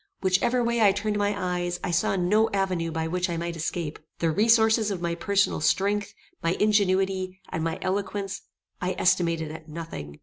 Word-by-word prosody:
Whichever 235 +7 +2
way 235 0 +1
I 200 -3 +6
turned 210 +1 -1
my 205 0 +1
eyes, 175 -2 -2
I 185 - -1
saw 170 +3 +1
no 210 +5 +3
avenue 185 -4 0
by 160 0 -2
which 180 +2 -1
I 170 - -2
might 170 0 -3
escape. 160 -1 -3 0.2
The 165 -1 +1
resources 220 +3 +4
of 195 -3 -3
my 170 -1 -1
personal 200 +1 +1
strength, 200 +5 +1 0.3
my 165 +1 +1
ingenuity, 190 -2 +1
and 160 - -3
my 165 0 -1
eloquence, 195 +1 -2 0.4
I 185 0 -1
estimated 170 -3 +1
at 160 0 -10
nothing. 115 - -7
185 Hz, 175 wpm, -26 LUFS, 170-205 Hz, 0.4 s, I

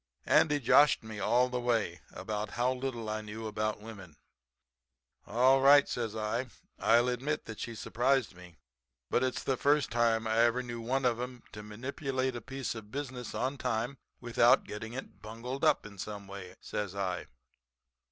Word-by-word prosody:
"Andy 150 -2 +4
joshed 145 +2 +5
me 110 -1 -7
all 125 +4 +3
the 125 0 -2
way 120 -3 0
about 105 -1 -4
how 125 +2 +2
little 125 -3 -4
I 110 0 -2
knew 110 +1 -7
about 110 0 -2
women. 100 -8 -10 1.1
"'All 130 +5 +4
right,' 140 +1 +7
says 115 -3 -3
I. 110 +4 -1 0.3
'I'll 120 +2 +4
admit 135 +5 -2
that 110 -1 -8
she 115 - -5
surprised 125 +1 +1
me. 90 -2 -14 0.5
But 125 - +3
it's 130 -1 -1
the 135 - 0
first 145 +2 +2
time 115 -1 +2
I 110 +1 +1
ever 120 +2 +3
knew 120 -1 -6
one 130 +3 0
of 120 -1 +2
'em 125 -1 -6
to 105 - -8
manipulate 130 +4 -3
a 120 - -5
piece 135 +2 -4
of 110 -3 -9
business 130 -2 -5
on 135 +2 -2
time 125 +2 -2 0.2
without 120 0 +4
getting 110 +2 -7
it 135 - -8
bungled 115 +5 -6
up - - +3
in 100 -2 -11
some 105 0 -6
way,' 95 -2 -9
says 100 -2 -4
I. 95 -2 -2
120 Hz, 170 wpm, -31 LUFS, 110-130 Hz, 1.1 s, right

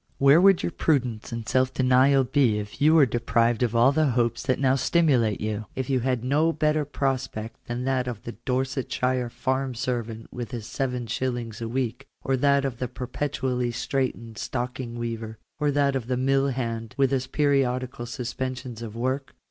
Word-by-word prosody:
Where 140 +5 +6
would 195 -1 +5
your - - -1
prudence 125 -11 0
and 115 -1 -5
self 130 0 +2
denial 130 +1 +4
be 125 -5 +2
if 105 +4 -7
you 155 +2 +6
were 155 -4 +7
deprived 120 -1 +1
of 120 -2 +1
all 120 +3 +6
the 155 +1 +2
hopes 120 -1 +1
that 130 -1 0
now 130 -1 +3
stimulate 135 - +2
you; 110 0 -3
if 130 0 -2
you 130 - +3
had 125 -1 -1
no 150 +6 +2
better 155 -1 +1
prospect 130 -6 -3
than 120 +1 -3
that 130 -1 0
of 115 -4 -5
the 120 - -5
Dorsetshire 130 +1 -1
farm 130 +1 -2
servant 115 -2 -4
with 120 -1 -5
his 120 -4 -6
7*. 120 -2 -3
a 115 - -2
week, 125 +2 -3 0.2
or 135 - +1
that 140 +1 +3
of 125 -3 -3
the 125 - -1
perpetually 125 0 -2
straitened 120 -2 -3
stocking 125 -1 -4
weaver, 115 -2 -4 0.2
or 150 -1 +2
that 140 -1 +2
of 125 -3 -3
the 125 -1 0
mill 135 +2 +2
hand 115 -4 -3
with 135 -1 +3
his 130 -1 0
periodical 130 -4 0
suspensions 125 0 -5
of 115 -2 -7
work 130 +3 -2
125 Hz, 180 wpm, -25 LUFS, 120-135 Hz, 0.2 s, were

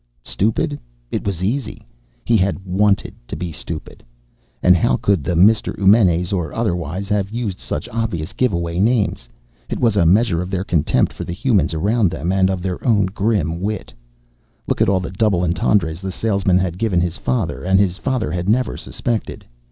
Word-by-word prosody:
Stupid? 110 +8 0 0.3
It - - -3
was 95 -3 -2
easy! 125 +7 -3 0.4
He 115 - +3
had 100 -2 +2
wanted 100 +2 +1
to - - -5
be 90 -2 -4
stupid! 80 +1 -7 0.6
And 90 0 +6
how 85 - +2
could 100 -7 +1
the 90 - -1
Mr. 105 +6 +3
Eumenes 95 -3 +4
or 85 -6 -2
otherwise 90 -4 -2
have 100 -2 0
used 110 -4 -4
such - - -4
obvious 105 -8 -3
giveaway 85 -8 -1
names? 105 - +1 0.4
It - - -3
was 115 -4 +2
a 90 -5 +4
measure 95 -2 +3
of 90 - -5
their 95 -1 -2
contempt 85 -6 +1
for - - -6
the 85 - -5
humans 100 -7 +1
around 105 +4 +2
them 85 +3 -3
and 95 -1 +3
of 95 -2 -2
their 95 -2 -3
own 105 -5 +3
grim 95 -6 0
wit. 105 0 -4 0.7
Look - - -1
at - - +4
all 95 -2 +2
the 90 - -5
double 95 -2 +1
entendres 85 -1 +1
the 95 0 -4
salesman 100 -3 +1
had 90 -1 -1
given 105 -6 +1
his 85 0 -1
father, 110 -10 -2
and 95 +2 +3
his 95 -2 +1
father 130 - -1
had 90 +2 -2
never 125 +4 +1
suspected. 115 -3 -4
95 Hz, 185 wpm, -19 LUFS, 90-110 Hz, 0.7 s, And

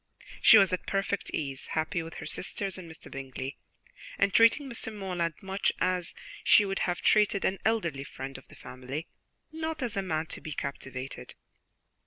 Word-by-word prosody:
She 225 - +10
was 195 -3 +5
at 180 - -2
perfect 195 -1 -1
ease, 135 -3 -3
happy 165 +3 0
with 165 0 -8
her - - -7
sisters 195 0 -2
and 180 -3 -8
Mr. 160 - -9
Bingley, 135 0 -6 0.6
and 200 -1 +2
treating 230 +5 +6
Mr. 235 -3 -3
Morland 180 -5 -2
much 195 +1 +1
as 180 -1 0 0.3
she 210 - +7
would 195 0 -2
have 175 - -1
treated 210 -2 +4
an 190 - +1
elderly 170 -11 +1
friend 135 -1 -7
of - - -21
the - - -15
family, 130 +5 -6 0.5
not 320 -2 -3
as 235 -3 -2
a 195 - +1
man 160 -4 -1
to - - -7
be 155 - -5
captivated. 135 -2 -5
185 Hz, 175 wpm, -29 LUFS, 150-200 Hz, 0.6 s, She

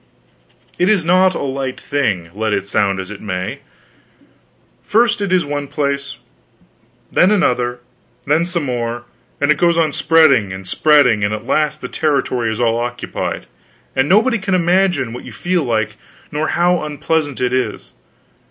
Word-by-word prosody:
It 180 +3 +3
is 200 -6 +2
not 185 +2 +4
a - - -3
light 135 -1 -3
thing, 100 -12 -2
let 110 +1 -1
it 100 - -1
sound 100 -1 0
as 95 +1 -6
it 105 - -9
may. 90 -3 -4 1.2
First 220 0 +2
it 200 -2 -2
is 180 -4 +3
one 145 0 -3
place; 140 0 -2 1.0
then 180 - +4
another; 125 -11 +1 0.4
then 150 +4 +2
some 170 -2 -1
more; 120 -2 -3 0.4
and 145 +1 +3
it 150 - +1
goes 170 -1 +3
on 160 -3 +2
spreading 140 - +4
and 95 0 -8
spreading, 140 -8 +3
and 105 +1 0
at 110 +1 -9
last 150 +2 0
the - - -4
territory 130 -6 0
is 110 - -4
all 115 -1 +1
occupied, 120 0 -4 0.5
and 130 +3 +1
nobody 225 +5 +3
can 195 -1 0
imagine 175 -8 +1
what 125 - -8
you - - -10
feel 175 -2 -1
like, 110 -4 -1 0.3
nor 155 +1 -1
how 175 0 +2
unpleasant 150 -1 -2
it 125 0 0
is. 125 -5 -2
140 Hz, 160 wpm, -17 LUFS, 115-170 Hz, 1.2 s, not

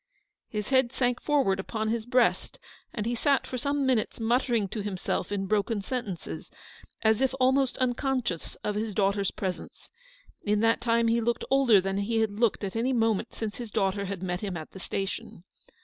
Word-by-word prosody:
His 210 -2 -3
head 260 -3 +3
sank 245 -2 0
forward 270 -11 +2
upon 215 +2 -2
his 230 0 -2
breast, 250 -1 +2 0.3
and 215 -3 -3
he 235 - 0
sat 275 +3 +2
for 255 - -4
some 280 +1 0
minutes 250 -4 +1
muttering 235 -2 +1
to 215 - -4
himself 200 0 -2
in 195 -1 -1
broken 205 +1 0
sentences, 185 - -5 0.5
as 220 +1 +3
if 265 0 +2
almost 265 0 +3
unconscious 255 - -1
of 210 - 0
his 210 -1 -3
daughter's 200 -1 +2
presence. 185 -2 -6 0.5
In 210 0 +1
that 225 0 +3
time 230 -1 +2
he 230 +1 +3
looked 235 +1 0
older 265 -7 +6
than 195 +1 -1
he 225 +3 0
had 220 -2 +1
looked 220 +1 +1
at 195 +1 -3
any 245 +4 +1
moment 225 -1 +1
since 220 -2 -4
his 240 -2 -6
daughter 195 0 0
had 190 -1 -5
met 180 -1 -2
him 195 -4 -4
at 155 - -8
the 190 - -10
station. 195 -2 -4
220 Hz, 185 wpm, -28 LUFS, 200-245 Hz, 0.5 s, older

